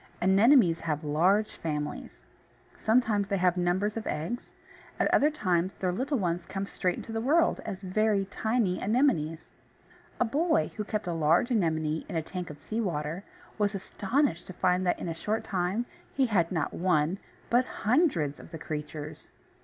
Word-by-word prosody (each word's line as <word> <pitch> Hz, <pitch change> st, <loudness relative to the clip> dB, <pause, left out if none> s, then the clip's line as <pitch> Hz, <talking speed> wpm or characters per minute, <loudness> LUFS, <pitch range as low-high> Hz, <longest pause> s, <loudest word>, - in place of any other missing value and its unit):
Anemones 195 Hz, -, +5 dB
have 155 Hz, -2 st, -2 dB
large 180 Hz, +8 st, +2 dB
families. 150 Hz, -2 st, -4 dB, 0.6 s
Sometimes 220 Hz, -3 st, +2 dB
they 200 Hz, -, 0 dB
have 180 Hz, -1 st, +3 dB
numbers 185 Hz, +4 st, 0 dB
of 225 Hz, -, -4 dB
eggs; 170 Hz, +11 st, -4 dB, 0.5 s
at -, -, +2 dB
other 295 Hz, -, +5 dB
times 185 Hz, -, 0 dB
their 185 Hz, -1 st, -1 dB
little 265 Hz, +9 st, -1 dB
ones 175 Hz, -4 st, -2 dB
come 195 Hz, 0 st, -3 dB
straight 180 Hz, -2 st, -1 dB
into -, -, -7 dB
the 225 Hz, 0 st, -2 dB
world 325 Hz, +7 st, +3 dB
as 195 Hz, -2 st, -5 dB
very 200 Hz, +1 st, +1 dB
tiny 220 Hz, -1 st, 0 dB
Anemones. 200 Hz, -, +1 dB, 0.7 s
A -, -, +3 dB
boy 285 Hz, -, +1 dB
who 215 Hz, -, -2 dB
kept 210 Hz, 0 st, -3 dB
a 175 Hz, -, -2 dB
large 165 Hz, -, +2 dB
Anemone 160 Hz, -7 st, 0 dB
in -, -, -5 dB
a 160 Hz, -, 0 dB
tank 180 Hz, +1 st, -6 dB
of 150 Hz, -, -9 dB
sea 220 Hz, +9 st, -3 dB
water, 165 Hz, -2 st, -3 dB, 0.4 s
was 205 Hz, 0 st, +1 dB
astonished 200 Hz, -, -1 dB
to 185 Hz, -, -8 dB
find 180 Hz, +1 st, +1 dB
that 175 Hz, -, +2 dB
in -, -, -5 dB
a 165 Hz, -, -2 dB
short 210 Hz, +7 st, -2 dB
time, 190 Hz, +5 st, -1 dB, 0.3 s
he 270 Hz, -, +2 dB
had 190 Hz, -8 st, +1 dB
not 160 Hz, -5 st, -1 dB
one, 175 Hz, 0 st, +1 dB, 0.3 s
but 245 Hz, +2 st, +4 dB, 0.2 s
hundreds, 210 Hz, -, +2 dB
of -, -, -12 dB
the 165 Hz, -, -7 dB
creatures. 150 Hz, -1 st, -6 dB
185 Hz, 170 wpm, -29 LUFS, 165-220 Hz, 0.7 s, Anemones